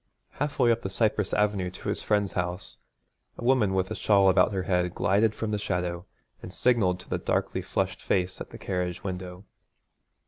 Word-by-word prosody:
Half 145 0 -3
way 120 -3 +4
up 115 0 0
the 95 - -4
cypress 105 0 +1
avenue 105 -3 +1
to 95 +3 -7
his 100 - -1
friend's 105 -2 +1
house 90 +1 -4 0.6
a - - -7
woman 120 -6 +3
with 95 0 0
a - - -2
shawl 100 -2 +4
about 95 - +4
her 95 -2 -2
head 90 -1 0
glided 105 +3 +2
from 110 -1 -3
the 105 - -1
shadow 90 -2 -2 0.3
and 90 - -8
signalled 100 -5 +2
to - - -17
the - - 0
darkly - - -1
flushed - - -2
face 90 0 -1
at - - -6
the - - -10
carriage 90 -2 -3
window. 90 0 -6
95 Hz, 195 wpm, -27 LUFS, 90-105 Hz, 0.6 s, way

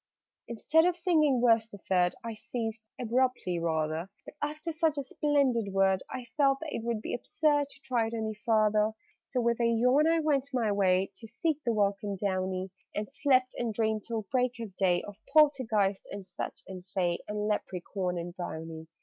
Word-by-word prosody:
_' - - -63 0.4
Instead 300 +8 +3
of 355 -1 +2
singing 305 -8 +3
Verse 225 -1 +4
the 205 - -11
Third, 180 -2 +1
I 230 -1 -4
ceased 225 0 -5
abruptly, 245 -7 0
rather: 160 +1 -1 0.2
But, - - -10
after 305 +3 -3
such 320 -1 +1
a 280 - -1
splendid 265 -7 +1
word, 190 -1 +3
I 255 -2 -5
felt 275 -2 +4
that 315 -2 -5
it 225 - -3
would 230 -2 -2
be - - -4
absurd 290 - +1
To 280 - -16
try 245 -4 0
it 230 - -4
any 220 -1 -2
farther. 215 0 +2 0.3
So 250 - -1
with 235 0 +1
a 235 - +4
yawn 250 +6 +4
I 330 0 +3
went 285 -3 +1
my 225 -4 +2
way 190 -1 +2
To 225 - -10
seek 310 +5 -2
the 235 - +1
welcome 200 -1 0
downy, 185 -1 -2 0.2
And 210 0 -2
slept, 260 -3 +2
and 230 -3 -2
dreamed 220 -1 +1
till 225 -2 -3
break 250 -1 +1
of 215 -5 -7
day 180 -3 +2
Of 205 +1 -10
Poltergeist 235 -10 +3
and 200 -2 -7
Fetch 180 - -6
and 185 -2 -8
Fay 180 -2 -1
And 210 0 -2
Leprechaun 185 -3 -2
and 170 +1 -5
Brownie! 160 -2 -6
225 Hz, 190 wpm, -30 LUFS, 195-260 Hz, 0.4 s, Verse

